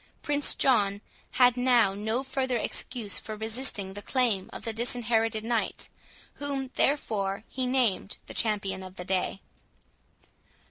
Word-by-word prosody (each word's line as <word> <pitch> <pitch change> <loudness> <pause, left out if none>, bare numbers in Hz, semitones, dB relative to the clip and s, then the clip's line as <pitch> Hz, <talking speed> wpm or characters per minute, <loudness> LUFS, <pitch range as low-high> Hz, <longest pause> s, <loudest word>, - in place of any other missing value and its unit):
Prince 290 0 +2
John 205 -6 +3 0.3
had 250 -1 +5
now 245 -5 +4
no 220 +5 -1
further 260 -2 -1
excuse 225 -3 -1
for 215 - -6
resisting 220 -3 -1
the 205 - -7
claim 230 -5 +1
of - - -8
the 225 - -1
Disinherited 225 -1 +1
Knight, 230 -1 -1 0.5
whom, 275 -2 -2
therefore, 205 -8 0
he 260 -1 -3
named 245 -6 +1
the - - -9
champion 200 -4 0
of 185 0 -10
the 180 - -7
day. 190 +1 -1
225 Hz, 135 wpm, -28 LUFS, 200-255 Hz, 0.5 s, had